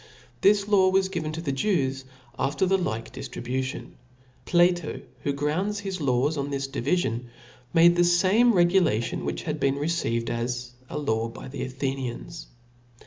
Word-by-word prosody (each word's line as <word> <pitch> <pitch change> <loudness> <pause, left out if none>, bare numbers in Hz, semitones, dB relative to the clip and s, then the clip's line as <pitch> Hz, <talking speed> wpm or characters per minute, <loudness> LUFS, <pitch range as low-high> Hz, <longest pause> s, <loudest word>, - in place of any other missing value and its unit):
This 200 0 +4
law 195 -3 +5
was 190 0 +2
given 160 -5 -3
to 165 - -4
the 150 -4 -2
Jews 135 -4 0 0.3
after 140 +6 +1
the 190 +1 +2
like 115 -9 -3
diftribution. 130 +1 -4 0.5
Plato 175 -2 +3
f"), - - -9 0.2
who 145 - -1
grounds 165 +9 -1
his 190 -3 -4
laws 140 +3 +1
on 140 0 -2
^mj - - -6
j^^^ - - -7
this 135 0 -2
divifion, 125 -4 -1 0.5
made 170 +1 +6
the 175 - +4
fame 190 +7 +4
regulation, 175 - +2
which - - -3
had 155 -1 -2
P^^^^ - - -13
been 135 0 +2
received 140 -6 -1
as 120 +1 -3 0.2
a - - -4
law 115 -6 0
by 120 - -9
the 135 0 -6
Athenians. 130 - -4
150 Hz, 170 wpm, -26 LUFS, 130-180 Hz, 0.5 s, made